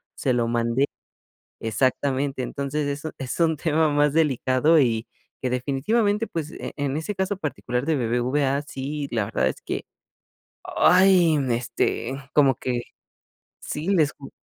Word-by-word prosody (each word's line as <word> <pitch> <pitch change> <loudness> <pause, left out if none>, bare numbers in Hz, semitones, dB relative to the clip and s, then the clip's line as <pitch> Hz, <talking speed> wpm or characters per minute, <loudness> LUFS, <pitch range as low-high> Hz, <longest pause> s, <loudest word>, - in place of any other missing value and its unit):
se 130 - 0
lo 120 -1 +1
mandé, 120 +3 +1 0.8
exactamente, 130 +4 0
entonces 140 +3 -2
eso 150 +2 -4
es 130 -2 -5
un 160 -2 +3
tema 160 +1 +2
más 145 0 +3
delicado 150 0 +3
y 115 -3 +1 0.3
que 130 - -1
definitivamente, 205 - +1
pues, 160 -4 -5
en 145 -1 -3
ese 160 +7 -3
caso 190 +1 -1
particular 130 -5 -3
de 160 - +2
BBVA 130 +4 0
sí, 145 0 -5
la 110 -3 0
verdad 110 - 0
es - - -6
que, - - -4 0.8
¡ay!, 180 -4 +5
este, 120 +1 -1 0.2
como 140 -3 +5
que 125 -2 -2 0.8
sí 155 +4 -5
les 160 -7 +3
cu 135 - -12
140 Hz, 135 wpm, -24 LUFS, 125-160 Hz, 0.8 s, ay